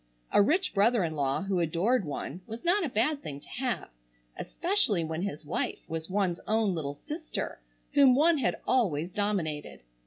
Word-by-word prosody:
A - - +6
rich 360 - +2
brother 220 +1 +3
in 160 -2 -2
law 140 +4 0
who 195 -2 0
adored 175 +7 +1
one 150 +3 -5
was 225 +8 -7
not 375 +3 +3
a 315 - -1
bad 260 +6 +1
thing 140 -2 -6
to - - -14
have, 250 -1 -3 0.5
especially 340 - +1
when 160 +1 -3
his 160 -6 -4
wife - - -3
was 165 +1 -4
one's 185 -3 0
own 215 -3 +2
little 145 -4 -3
sister 305 - -5 0.3
whom 270 -3 +6
one 315 +2 +4
had - - +1
always 180 - +1
dominated. 175 - -2
200 Hz, 175 wpm, -29 LUFS, 160-260 Hz, 0.5 s, A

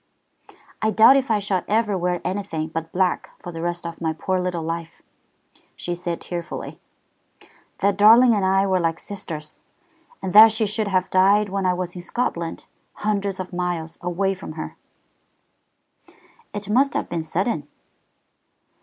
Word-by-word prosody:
"I 220 - +2
doubt 220 +5 +7
if 270 -2 +1
I 220 - +3
shall 200 -2 -1
ever 215 -1 +1
wear 180 -1 -1
anything 185 -5 -3
but 165 0 -5
black 185 -1 0
for 175 - -6
the 165 -1 -6
rest 175 0 -3
of 170 0 -7
my 160 -1 0
poor 185 +4 -1
little 180 -2 -2
life," 165 +1 -5 0.7
she 175 - -4
said 175 -1 -4
tearfully. 170 -1 -6 1.0
"That 200 -1 +2
darling 230 +4 +7
and 205 -3 +1
I 195 +1 +3
were 190 -1 +2
like 165 -1 0
sisters. 155 -6 -8 0.6
And 185 -1 -4
that 220 +1 +10
she 220 0 +1
should 215 +1 -1
have 185 -1 0
died 200 +2 +4
when 195 -1 -1
I 180 - +2
was 180 0 -4
in 180 - -6
Scotland, 175 -5 -3 0.4
hundreds 200 -2 -1
of 185 0 -6
miles 175 -2 -3
away 185 +2 0
from 185 -4 -8
her!" 155 - -7 1.8
"It 205 0 -6
must 260 +6 +2
have - - -1
been 170 -1 -3
sudden?" 160 -1 -2
185 Hz, 160 wpm, -23 LUFS, 170-205 Hz, 1.8 s, that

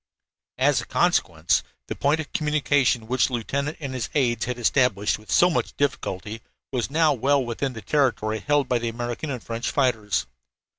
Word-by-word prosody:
As 135 -1 +3
a - - -10
consequence, 90 - +2 0.2
the - - -5
point 145 +3 +1
of 155 - -6
communication 145 -6 +1
which 125 +3 +2
the 130 - -8
lieutenant 140 +5 -2
and 140 -4 -5
his 125 -3 -3
aides 125 -5 +1
had 125 +1 -3
established 120 -5 +2
with 110 - -19
so 175 - +5
much 175 - -2
difficulty 110 -6 -2 0.3
was 125 -2 -1
now 155 +1 +3
well 135 +1 +2
within 125 +3 -3
the 110 - -9
territory 120 -7 +1
held 145 +4 +1
by 125 -1 +1
the 115 0 -2
American 120 +5 -4
and 125 -4 -4
French 115 +1 -3
fighters. 115 - +1
125 Hz, 180 wpm, -24 LUFS, 115-145 Hz, 0.3 s, so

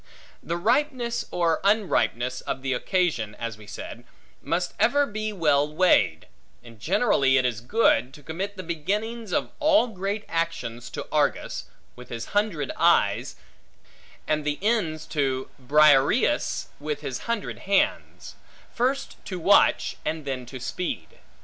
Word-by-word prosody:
The 170 - -3
ripeness, 235 - 0
or 170 -2 +1
unripeness, 130 - +1
of 130 - -3
the 135 -1 0
occasion 155 - 0
(as 115 -2 -5
we 105 -1 -15
said) 105 - -8 0.4
must 175 +1 -1
ever 285 +4 +4
be 215 -3 -4
well 150 -6 +2
weighed; 150 - +3 0.4
and 115 -2 -14
generally 155 - +3
it 130 - +2
is 115 -3 -1
good, 130 - +2
to 150 - -15
commit 190 +7 -5
the 185 - -5
beginnings 205 +7 -3
of - - 0
all 305 -4 +4
great 200 +1 -3
actions 165 -9 -3
to - - -6
Argus, - - 0 0.3
with 125 0 -12
his 115 -1 -5
hundred 205 -9 0
eyes, - - +3 0.9
and 155 0 0
the 150 0 -1
ends 195 -9 0
to 135 -3 -1
Briareus, 150 - +3
with 150 0 -4
his 130 -4 -4
hundred 230 -3 -2
hands; 200 0 0 0.4
first 260 +3 -1
to 185 - -5
watch, 195 +4 +3
and 155 -2 -3
then 130 -3 -4
to 130 +1 -8
speed. 120 - -5
165 Hz, 140 wpm, -25 LUFS, 130-210 Hz, 0.9 s, ever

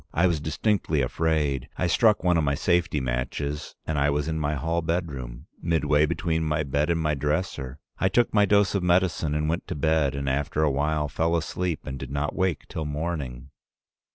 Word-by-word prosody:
I 85 - +4
was 85 -4 +2
distinctly 80 -1 0
afraid. 75 -3 0
I - - 0
struck 105 +4 +3
one 90 -1 +3
of 80 - +2
my 70 -1 +1
safety 85 -1 +1
matches, 65 +4 -3
and 80 -2 -1
I 70 +1 +3
was 75 0 0
in 80 -1 -1
my 75 0 0
hall 80 +5 -1
bedroom, 75 -8 -3 0.2
midway 75 -2 +2
between 80 0 -1
my 75 0 0
bed 70 +2 0
and 85 -1 +2
my 75 -1 +1
dresser. 75 -2 -2 0.2
I 95 - +3
took 120 +5 +2
my 105 -1 +5
dose 100 -1 +3
of 100 - +1
medicine 85 -4 +2
and 75 0 0
went 85 +2 -2
to - - -4
bed, 75 -1 +1
and 70 0 -3
after 70 +3 0
a 75 - +3
while 75 +2 0
fell 80 +4 0
asleep 85 +1 -3
and 65 0 -5
did 65 - -6
not 70 +2 -2
wake 95 -4 -1
till 80 - -4
morning. 75 -4 -4
75 Hz, 200 wpm, -26 LUFS, 70-85 Hz, 0.2 s, my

